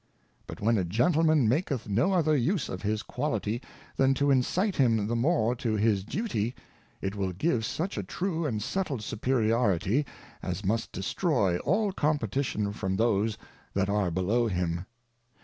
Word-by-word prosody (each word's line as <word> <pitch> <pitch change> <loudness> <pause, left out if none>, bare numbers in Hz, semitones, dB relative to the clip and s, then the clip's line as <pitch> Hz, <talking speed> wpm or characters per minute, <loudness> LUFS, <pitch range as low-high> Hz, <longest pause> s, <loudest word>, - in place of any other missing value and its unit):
But - - -8
when 110 +1 +3
a - - +1
Gentleman 155 - +3
maketh 135 - 0
no 115 - +2
other 155 -4 +3
use 150 +5 0
of 90 - -5
his 105 +1 -1
Quality, 120 -4 -2 0.4
than 135 0 +4
to 140 +1 +2
incite 180 - +1
him 115 -6 +3
the 115 +3 -1
more 125 -2 +2
to 115 -3 -1
his 105 -2 +2
Duty, 120 - -2 0.5
it 95 +1 -2
will 95 -2 -1
give 120 - 0
such 170 - -2
a - - -3
true 170 -4 -2
and 110 -6 -2
settled 150 - -2
Superiority, 115 - +1 0.3
as 90 +2 -4
must 110 +4 0
destroy 100 - 0
all 210 -2 +1
Competition 135 - 0
from 95 -2 -2
those 110 0 +1 0.4
that 100 0 +1
are 100 -2 +1
below 100 +8 +1
him. 90 -2 -2
115 Hz, 155 wpm, -28 LUFS, 100-145 Hz, 0.5 s, than